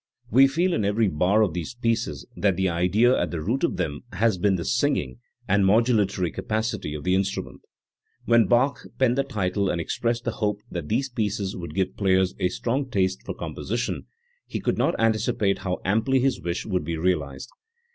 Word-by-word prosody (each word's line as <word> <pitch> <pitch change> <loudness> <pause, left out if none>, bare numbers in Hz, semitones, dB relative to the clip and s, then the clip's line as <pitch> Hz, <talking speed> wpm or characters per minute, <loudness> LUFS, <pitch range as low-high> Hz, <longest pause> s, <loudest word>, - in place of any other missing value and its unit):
We 135 +5 +7
feel 170 +7 +1
in 110 - 0
every 105 +2 +2
bar 95 +6 +3
of 95 -7 0
these 90 +7 -5
pieces 115 - -1
that 100 -3 +1
the 95 0 +2
idea 95 +9 +3
at 85 - 0
the 85 - -4
root 115 - -1
of - - +1
them 70 -1 -2
has 105 0 +1
been 100 +1 +3
the 85 - -3
singing 60 -2 0 0.3
and 100 +1 +3
modulatory 100 - +2
capacity 110 - -2
of 75 - -6
the 90 - +1
instrument. 95 0 -2 0.6
When 115 -3 +4
Bach 130 +6 +3 0.2
penned 125 -2 +3
the 140 - +2
title 100 -6 -1
and 85 - -1
expressed 115 +8 -1
the 120 - -1
hope 105 -4 -1
that 85 -4 -5
these 130 +5 +1
pieces 105 -4 -2
would 85 -4 -7
give 95 -1 -1
players 95 -2 +2
a 90 -2 +2
strong 130 +8 -2
taste 95 -4 0
for - - -5
composition, 115 +4 -4 0.4
he - - -4
could - - -1
not - - +1
anticipate 110 -3 +1
how 90 -1 -2
amply 110 +7 +2
his 135 +1 +1
wish 85 +1 -3
would 95 -6 -1
be 80 +1 -3
realised. 75 -6 -1
100 Hz, 190 wpm, -25 LUFS, 90-115 Hz, 0.6 s, We